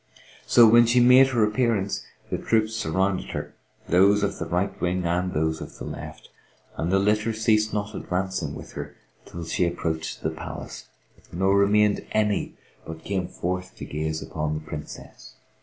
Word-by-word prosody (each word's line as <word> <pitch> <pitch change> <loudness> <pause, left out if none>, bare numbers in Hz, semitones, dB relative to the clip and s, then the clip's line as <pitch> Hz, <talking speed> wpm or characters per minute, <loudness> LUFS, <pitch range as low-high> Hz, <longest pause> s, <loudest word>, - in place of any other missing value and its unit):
So 120 -1 +7
when 120 +1 +6
she 120 +2 +4
made 125 +2 +7
her 120 -5 +1
appearance, 105 -2 0 0.3
the - - -1
troops 110 -1 +1
surrounded 95 -2 -1
her, - - -5 0.3
these 100 +4 +4
of 100 - -2
the - - -4
right 90 +3 0
wing 90 0 0
and 90 +2 0
those 80 0 -1
of - - -9
the - - -7
left, - - -8 0.5
and 85 +2 -2
the 95 - +4
litter 105 +3 +1
ceased 110 -1 +2
not 105 0 -3
advancing 90 -7 -3
with - - -10
her - - -7 0.3
till 85 -1 -7
she 80 - 0
approached 80 -2 -3
the - - 0
palace; - - -8 0.4
nor 95 +3 +2
remained 105 +1 +3
any 105 -2 0 0.3
but 80 0 -9
came 95 -3 -2
forth 90 +1 -4
to - - -8
gaze 80 +1 -3
upon 75 -1 -3
the 75 - -4
Princess. 75 -1 -9
95 Hz, 170 wpm, -25 LUFS, 85-105 Hz, 0.5 s, So